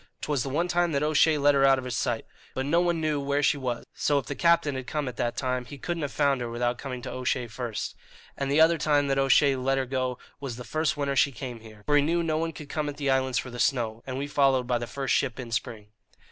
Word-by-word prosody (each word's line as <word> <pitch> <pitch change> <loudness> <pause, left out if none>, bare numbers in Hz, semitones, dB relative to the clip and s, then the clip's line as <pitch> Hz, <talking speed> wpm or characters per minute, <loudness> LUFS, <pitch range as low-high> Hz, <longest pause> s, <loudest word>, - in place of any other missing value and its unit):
'Twas 145 -3 -1
the 135 - -3
one 165 +6 0
time 175 -1 +1
that 140 +1 +1
O'Shea 155 +1 +4
let 145 0 +4
her 135 -1 +3
out 135 -1 +6
of 130 - -5
his 125 -2 -3
sight; 115 -1 -1 0.3
but 130 - -1
no 165 +5 +3
one 175 -2 +1
knew 155 -2 0
where 140 +1 0
she 150 - +4
was, 125 -4 -3
so 145 - +1
if 135 - -1
the - - -4
Captain 170 -2 +3
had 130 -1 -5
come 150 -3 -2
at 125 - -5
that 120 0 -2
time 130 -1 -1
he 130 +4 -10
couldn't 170 +4 -3
have 145 -2 -2
found 140 -3 +1
her 120 - -3
without 120 +1 -1
coming 130 -3 -6
to - - -5
O'Shea 125 -1 -1
first. 115 -1 -5 0.4
And 140 -1 -3
the 145 - +3
other 165 +1 +5
time 145 -1 +2
that 135 0 +2
O'Shea 135 +1 +4
let 135 +1 0
her 135 - 0
go 130 -1 -2 0.2
was 135 -4 -5
the 125 - -8
first 155 +5 -1
winter 140 -1 -1
she 140 +1 +4
came 125 -2 -7
here, 110 -2 -14
for 145 - +2
he - - +5
knew 170 +4 +1
no 155 -1 0
one 165 0 -1
could 150 -1 -10
come 150 0 -2
at 145 - -7
the 140 -2 0
islands 130 -2 +1
for 125 - -3
the 125 - -8
snow, 115 -5 0
and 130 0 -4
we 140 - -2
followed 135 -3 +2
by 120 -1 0
the 120 - -5
first 135 +3 -2
ship 130 -3 0
in 120 -2 -7
spring." 110 -2 -4
135 Hz, 280 wpm, -27 LUFS, 125-145 Hz, 0.4 s, out